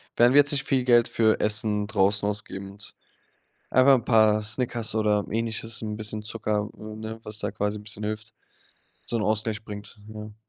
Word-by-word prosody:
werden 120 +2 +5
wir 145 - +7
jetzt 140 -1 +5
nicht 140 -1 -1
viel 130 -2 +2
Geld 120 -2 +5
für 110 -1 +2
Essen 105 -1 +2
draußen 100 -1 +2
ausgeben 100 -1 -4
und 100 0 -7 0.8
einfach 130 -2 +5
paar 110 -2 +4
Snickers 115 0 -1
oder 105 -2 +2
Ähnliches, 115 0 -2
'n 105 -1 -4
bisschen 110 0 -4
Zucker, 105 -1 -2
äh, - - -14
ne, 110 +1 -7
was 105 -1 -6
da 105 - -3
quasi 105 +1 -2
'n - - -11
bisschen 105 0 -5
hilft, 110 +1 -5 0.7
so - - -3
'n 110 - -1
Ausgleich 110 0 -1
bringt, 105 +1 -8
ne? 105 -1 -9
110 Hz, 185 wpm, -26 LUFS, 105-115 Hz, 0.8 s, wir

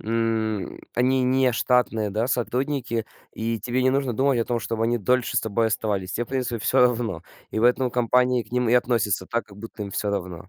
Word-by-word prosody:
м, 110 -2 -1
они 130 +2 +2
не 130 0 +3
штатные, 115 -3 +1
да, 110 +4 0
сотрудники, 125 -1 -1 0.3
и 115 +1 -2
тебе 125 +1 -1
не 130 - +4
нужно 135 -2 0
думать 135 +2 +2
о 115 - +1
том, 120 0 -1
чтоб 115 +1 -4
они 120 +1 +1
дольше 125 +4 +1
с - - +4
тобой 110 +1 0
оставались. 105 -4 -2
Тебе, 120 - -1
в - - -25
принципе, 130 -3 -2
всё 110 +5 +1
равно, 115 -8 +1 0.3
и - - -2
в 110 - +1
этом 125 +1 +3
компании 125 +1 +2
к 105 - -22
ним 125 -1 +1
и - - +2
относится 115 -6 +1
так, 115 0 -2
как 100 -2 -15
будто 115 0 -8
им 100 - -6
всё 105 +1 -2
равно.. 90 -2 -5
115 Hz, 220 wpm, -24 LUFS, 110-125 Hz, 0.3 s, не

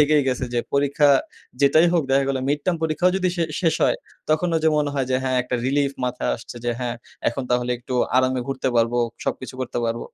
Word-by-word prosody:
থেকেই 150 0 +4
গেছে 130 0 -1
যে, - - +2 0.2
পরীক্ষা 140 +1 +3 0.5
যেটাই 155 +4 +5
হোক। 170 -2 +3
দেখা 135 +1 +3
গেলো 135 -1 0
মিড-টার্ম 150 +5 0
পরীক্ষাও 160 +3 +2
যদি 185 -1 +1
শে 170 - +1 0.2
শেষ 165 -4 +2
হয়, - - +2 0.3
তখনো 165 +2 +1
যে 160 - +4
মনে 145 -1 +1
হয় 135 -2 0
যে, 130 - +3
হ্যাঁ, 130 -1 +1
একটা 125 0 -2
রিলিফ 140 +1 +1
মাথায় 125 0 -1
আসছে 120 +1 -11
যে 120 - +1
হ্যাঁ, 120 -1 -2 0.3
এখন 120 +3 -4
তাহলে 125 0 +1
একটু 125 +1 -6 0.2
আরামে 130 0 +2
ঘুরতে 135 -1 -2
পারবো, 115 +1 +2 0.3
সবকিছু 130 - -4
করতে 125 -1 -3
পারব। 115 +1 -2
135 Hz, 205 wpm, -23 LUFS, 125-150 Hz, 0.5 s, যেটাই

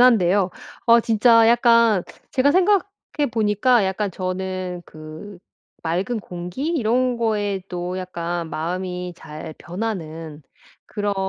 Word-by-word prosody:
한데요. 200 -6 +5 0.4
어 235 0 +7
진짜 230 0 +5
약간 230 -4 +5 0.3
제가 270 +2 +3
생각해 370 -5 +1
보니까 220 +1 +3
약간 190 +2 -1
저는 185 0 -4
그 155 +6 -10 0.4
맑은 185 +8 -1
공기 180 - -5
이런 250 -4 +1
것에도 195 -5 -2
약간 175 -2 -4
마음이 180 +2 -3
잘 155 -1 -9
변하는 165 -6 -5 0.4
그런 205 -1 -2
195 Hz, 220 characters per minute, -22 LUFS, 175-230 Hz, 0.4 s, 어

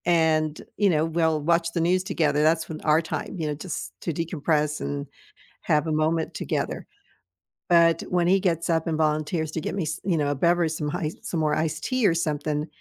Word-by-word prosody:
And, 160 -3 +2 0.2
you 205 -2 +4
know, 155 -2 +2
we'll 160 -1 +1
watch 165 +2 +1
the 170 - 0
news 180 +2 +2
together. 150 -5 +1
That's 160 +1 +2
when 155 -1 -7
our 155 +1 +3
time, 160 - -5
you 160 -3 -2
know, 150 - -1
just 140 - -6
to 165 - -2
decompress 150 -2 -1
and 140 0 -3 0.5
have 150 +1 +1
a - - -1
moment 155 +1 0
together. - - -3 0.8
But 165 -1 +5
when 175 -1 +1
he 190 +1 +4
gets 170 -3 0
up 160 -1 +1
and 160 -2 0
volunteers 155 +1 0
to 160 - -2
get - - -4
me 195 - -1
s 155 +1 -4
you 180 -3 +1
know, 145 -2 0
a - - +1
beverage, 170 +2 +2
some 150 -2 -3
ice 165 -3 -3
some 165 - -3
more 155 -1 +2
iced 155 0 -2
tea 255 -4 +1
or 165 - +3
something, 150 -2 -1
160 Hz, 210 wpm, -25 LUFS, 155-170 Hz, 0.8 s, But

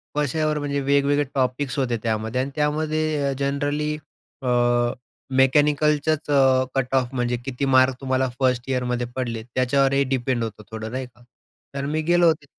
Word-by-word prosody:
कश्यावर 150 +1 0
म्हणजे 140 -1 -2
वेगवेगळे 140 +1 +2
टॉपिक्स 130 +1 -1
होते 120 -3 0
त्यामध्ये 110 +2 -1
आणि 135 - -3
त्यामध्ये 155 0 0
अ, - - 0
जनरली 145 +2 -1 0.5
अ, 130 - -4 0.9
मेकॅनिकलचाच 150 +2 +2
अ, 130 -2 +4
कट 135 -1 -1
ऑफ 130 0 0
म्हणजे 120 -1 -1
किती 135 +1 -2
मार्क 130 -1 +4
तुम्हाला 130 0 0
1st 125 -1 +1
ईयरमध्ये 125 -2 -1
पडलेत? 115 -3 -3
त्याच्यावर 135 +2 +2
हे 140 0 +3
डिपेंड 130 -2 -1
होतं 110 -1 -6
थोडं 110 0 -6
नाही 130 +1 -3
का. 120 - -25 0.5
कारण 140 0 -3
मी 155 0 0
गेलो 175 +1 +3
होतो 155 -2 +1
135 Hz, 155 wpm, -23 LUFS, 125-145 Hz, 0.9 s, अ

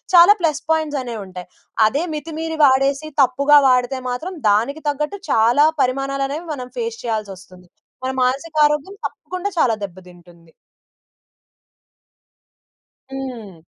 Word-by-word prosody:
చాలా 355 +5 +8
plus 310 -3 0
points 310 -3 0
అనేవి 235 -3 -6
ఉంటాయి. 180 -1 -10 0.4
అదే 280 +8 -1
మితిమీరి 320 +1 -5
వాడేసి 275 +3 +2
తప్పుగా 280 +3 +5
వాడితే 250 +1 +1
మాత్రం 325 +10 -4 0.2
దానికి 235 +10 +1
తగ్గట్టు 300 +7 -3
చాలా 235 +6 +4 0.2
పరిమాణాలు 275 +2 -1
అనేవి 315 +4 -5
మనం 250 -2 -8
ఫేస్ 460 0 -4
చేయాల్సివస్తుంది. 190 -5 -6 0.4
మన 260 - -1
మానసిక 275 +6 -1
ఆరోగ్యం 300 +6 -1
తప్పకుండా 370 +2 -5
చాలా 240 -7 +3
దెబ్బ 185 -2 -7
తింటుంది. 175 -2 -18 2.6
హ్మ్. 230 -11 -7
270 Hz, 120 wpm, -20 LUFS, 225-310 Hz, 2.6 s, చాలా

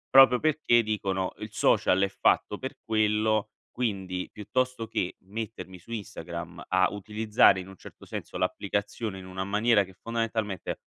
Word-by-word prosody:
Proprio 130 -2 +9
perché 155 -6 +3
dicono: 95 -3 -1
"Il 105 0 -6
social 95 -2 +3
è 100 - +4
fatto 100 +1 +1
per 130 +4 -6
quello, 110 -1 +1 0.2
quindi 95 -6 -2
piuttosto 125 +2 -2
che 90 - -2
mettermi 105 -1 -7
su 105 - -16
Instagram 85 -5 -6
a 95 0 +4
utilizzare 105 0 +3
in 95 - -7
un 95 - -11
certo - - -13
senso - - -6
l'applicazione 100 0 -2
in 95 - -10
una 95 0 -4
maniera 105 +2 +3
che 95 - -13
fondamentalmente" 115 -3 -3
105 Hz, 150 wpm, -28 LUFS, 95-115 Hz, 0.2 s, Proprio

